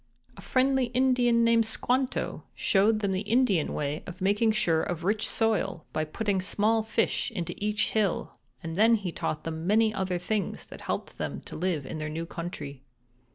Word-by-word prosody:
"A - - -11
friendly 265 0 +2
Indian 245 -1 +3
named 230 0 +4
Squanto 255 +3 -1
showed 215 +2 +3
them 200 -2 0
the 185 - 0
Indian 225 - +2
way 150 +1 -2
of 180 0 -8
making 205 +4 +3
sure 165 -7 +2
of 170 -2 -3
rich 210 +4 +1
soil 205 -6 0
by 155 - 0
putting 195 +4 -1
small 215 +4 +2
fish 220 - 0
into 180 -7 -4
each 210 0 +1
hill, 210 -4 0 0.3
and 210 +8 +3
he 190 -4 -4
taught 155 -1 -3
them 160 +1 -4
many 215 +2 +4
other 190 -3 -1
things 195 +2 -2
that - - -11
helped - - -4
them 70 -3 -3
to - - -10
live 165 -4 -1
in - - -5
their 155 0 -3
new 165 +2 -4
country. 150 -6 -6
200 Hz, 175 wpm, -28 LUFS, 165-225 Hz, 0.3 s, named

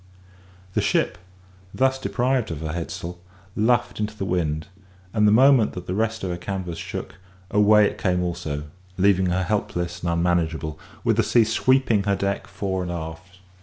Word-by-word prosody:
The - - +1
ship, - - +1 0.6
thus 130 0 +2
deprived 130 -2 0
of 80 -3 -5
her 80 -1 -3
head 85 -1 -4
sail, 85 +1 -6 0.4
luffed 120 +2 +1
into 105 0 -3
the 95 - -3
wind; 80 -4 -1 0.5
and 105 -1 +4
the - - +5
moment 130 0 +5
that 90 -1 -7
the 90 - -3
rest 110 +2 -1
of 95 - -1
her 85 - -3
canvas 90 -2 -4
shook, - - -6 0.3
away 105 0 +6
it - - -2
came 90 -2 +1
also, 85 -4 -3 0.3
leaving 95 -1 +3
her 90 +1 +1
helpless 90 -3 -2
and 85 - -1
unmanageable, 85 -2 0 0.2
with 115 -2 +2
the - - +5
sea 110 +2 +4
sweeping 115 -2 +2
her 100 -1 +2
deck 100 +1 -2
fore 95 -2 -3
and 90 -1 -3
aft. 85 +2 -7
95 Hz, 175 wpm, -24 LUFS, 85-110 Hz, 0.6 s, away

